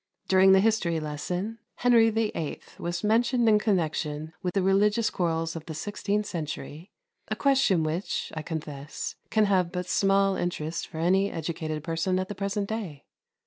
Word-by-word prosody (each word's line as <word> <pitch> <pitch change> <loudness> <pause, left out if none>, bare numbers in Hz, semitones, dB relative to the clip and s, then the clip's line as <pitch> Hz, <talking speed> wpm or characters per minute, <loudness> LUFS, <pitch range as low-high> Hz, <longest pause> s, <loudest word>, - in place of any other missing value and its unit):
During 190 0 +6
the 190 - +6
history 195 -7 +1
lesson 175 +9 -4 0.2
Henry 235 -2 +5
VIII. 210 -8 -2 0.2
was 175 0 -3
mentioned 235 +3 +3
in 210 -1 +6
connection 160 -6 -1
with 180 -1 -3
the 195 - +2
religious 205 +4 +3
quarrels 165 -2 -1
of 160 -1 -7
the 160 - -5
sixteenth 205 +4 -2
century, 160 0 -6 0.4
a - - -2
question 270 - +3
which, 160 +5 -2
I 155 - -4
confess, 150 -3 -5 0.2
can 215 - +3
but 185 -3 +1
have 180 0 -2
small 195 0 +3
interest 170 -2 -3
for - - -10
any 190 +4 +2
educated 160 -2 -4
person 165 +3 0
at 185 0 -2
the - - -3
present 200 +1 -2
day. 195 -11 -5
185 Hz, 160 wpm, -27 LUFS, 160-210 Hz, 0.4 s, During